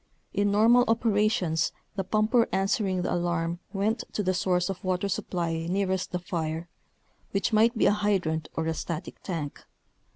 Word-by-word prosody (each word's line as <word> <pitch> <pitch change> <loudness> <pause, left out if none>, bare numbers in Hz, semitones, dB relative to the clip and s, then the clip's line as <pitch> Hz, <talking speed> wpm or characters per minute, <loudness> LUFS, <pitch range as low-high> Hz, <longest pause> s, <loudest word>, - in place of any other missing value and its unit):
In 205 0 +2
normal 225 +4 +5
operations 210 -7 +2 0.2
the 195 - -1
pumper 215 +4 +2
answering 195 -2 +1
the - - -1
alarm 170 -1 -1
went 210 +3 0
to 210 - -1
the 185 0 +1
source 180 -1 +1
of 195 -2 -5
water 185 +1 0
supply 170 -4 -2
nearest 190 0 0
the 180 - -1
fire, 165 -2 -3 0.7
which 200 +3 0
might 225 +2 +4
be - - +3
a - - +6
hydrant 195 -7 0
or 160 - -1
a 160 - 0
static 165 +2 -5
tank. 160 -6 -5
190 Hz, 160 wpm, -27 LUFS, 170-210 Hz, 0.7 s, a